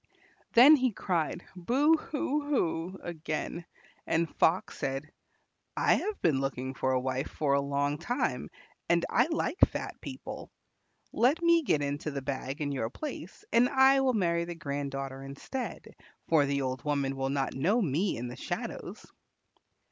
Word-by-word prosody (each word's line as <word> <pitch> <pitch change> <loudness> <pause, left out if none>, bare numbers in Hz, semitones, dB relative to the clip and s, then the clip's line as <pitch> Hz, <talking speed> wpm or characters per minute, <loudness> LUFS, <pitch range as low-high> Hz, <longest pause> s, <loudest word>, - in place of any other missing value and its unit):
Then 275 +6 +9
he 255 -2 +1
cried 175 -3 -2
"Boo 265 - +3
hoo 300 -1 -2
hoo" 185 - -1
again, 165 0 -4 0.4
and 165 -1 0
Fox 170 +3 +2
said, 135 +2 -3 0.7
"I - - +4
have 425 0 -1
been 155 -6 +3
looking 130 -1 -3
for 130 0 0
a 130 - +2
wife 130 +2 -2
for 145 -3 0
a 140 - +3
long 145 +1 -1
time, 245 +3 -2 0.4
and - - +3
I - - +4
like 330 +3 -2
fat - - +1
people. - - -7 0.6
Let 285 +8 +2
me 335 0 +5
get 150 - +1
into 145 +2 -2
the 140 -2 -5
bag 135 +1 -4
in 145 -1 -1
your 120 -5 -2
place, 305 - -7
and 245 +2 +5
I 265 0 +5
will 260 -1 +2
marry 170 -5 +1
the 170 0 -6
grand 140 -3 -3
daughter 135 0 -5
instead, 140 - -6 0.4
for 150 -4 +4
the 140 0 0
old 130 0 -3
woman 140 -2 0
will 135 0 -1
not 135 -1 -1
know 180 - +2
me 175 - 0
in 120 +2 -4
the 120 - -7
shadows." - - -5
155 Hz, 165 wpm, -30 LUFS, -, 0.7 s, Then